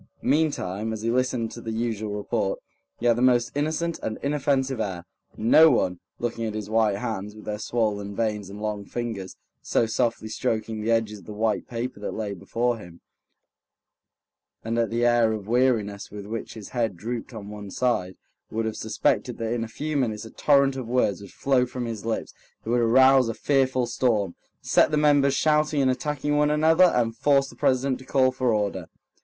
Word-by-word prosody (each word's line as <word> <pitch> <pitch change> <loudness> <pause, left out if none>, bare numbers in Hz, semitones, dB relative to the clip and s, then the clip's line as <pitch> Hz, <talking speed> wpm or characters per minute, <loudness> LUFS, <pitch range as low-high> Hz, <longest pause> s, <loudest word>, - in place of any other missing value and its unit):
Meantime, 115 - 0
as 110 -1 -5
he 115 - +1
listened 125 -2 0
to 120 - -9
the 115 - -5
usual 110 -2 -2
report, 105 -1 -1 0.4
he 120 - -5
had 120 -1 +5
the 120 - -2
most 120 -2 +3
innocent 160 +3 -1
and 110 - -3
inoffensive 135 -3 0
air. 90 -5 -4 0.3
No 155 +9 +6
one, 90 - +1 0.2
looking 115 -1 -3
at 110 -1 -3
his 105 -1 -5
white 110 -2 +3
hands, 105 0 -4
with 110 - -12
their 105 -1 -4
swollen 105 -3 -1
veins 105 -3 -2
and 100 +1 -9
long 105 -1 -3
fingers, 110 -4 -5 0.3
so - - +1
softly 115 0 -1
stroking 110 -1 -2
the 110 - -2
edges 110 -2 +1
of 90 - -17
the 105 - -8
white 110 0 0
paper 120 -1 -4
that 105 - -5
lay 105 -2 -3
before 115 +5 -1
him, 85 -3 -12 1.6
and 115 +1 -1
at 115 - +1
the 120 +1 0
air 120 -2 +4
of 105 -2 -6
weariness 115 -4 +1
with 100 -1 -8
which 115 +2 -6
his 110 -3 -9
head 115 -7 -1
drooped 115 +6 -5
on 105 -4 -8
one 105 -1 -8
side, 95 -5 -1 0.3
would 110 +1 -2
have 110 - -2
suspected 110 +2 0
that 115 0 -2
in 120 -1 -1
a - - -4
few 150 +7 -4
minutes 115 -5 -1
a 110 - -10
torrent 140 -2 +3
of 130 -3 -5
words 115 -6 +1
would 100 - -11
flow 135 -2 +2
from 125 0 -4
his 115 -2 -5
lips 115 - -3 0.3
that 115 - -3
would 120 0 +3
arouse 130 +1 +5
a 115 - -3
fearful 130 -3 +1
storm, 110 -8 0 0.3
set - - +4
the 150 - 0
members 145 -2 +4
shouting 150 0 +2
and 130 -1 +3
attacking 145 +2 -1
one 150 0 +3
another, 160 +4 +5
and 120 -9 +1
force 140 0 +3
the - - -15
president 130 0 +1
to - - -11
call 130 -2 +3
for 130 -1 0
order. 100 -5 -1
115 Hz, 195 wpm, -25 LUFS, 105-130 Hz, 1.6 s, No